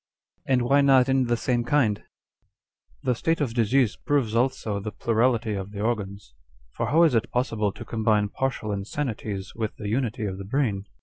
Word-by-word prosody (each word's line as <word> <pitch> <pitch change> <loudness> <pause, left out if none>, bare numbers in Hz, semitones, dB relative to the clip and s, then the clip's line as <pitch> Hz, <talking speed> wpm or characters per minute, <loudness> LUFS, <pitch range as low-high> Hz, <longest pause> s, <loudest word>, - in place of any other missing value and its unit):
2 135 - +2
And 125 - +3
why 140 +4 +4
not 135 -2 +5
in 135 -1 +3
the 120 0 +1
same 120 0 0
kind? 120 -5 +1 0.5
" - - -40
The 130 - +2
state 165 +7 0
of 135 -6 -1
disease 120 0 +2
proves 130 -7 0
also 115 -4 0
the 105 +2 -5
plurality 115 0 +1
of 95 -1 -4
the 100 0 -6
organs. 100 - -3 0.4
For - - -3
how 165 +3 +4
is 160 -5 +4
it 115 - +1
possible 115 -5 0
to 100 - -10
combine 110 -2 +1
partial 120 -3 -2
insanities 100 -2 -4
with 110 -2 -4
the 105 -2 -5
unity 120 -1 -1
of 95 -1 -4
the 100 - -6
brain 105 -4 -1
115 Hz, 190 wpm, -25 LUFS, 105-130 Hz, 0.5 s, not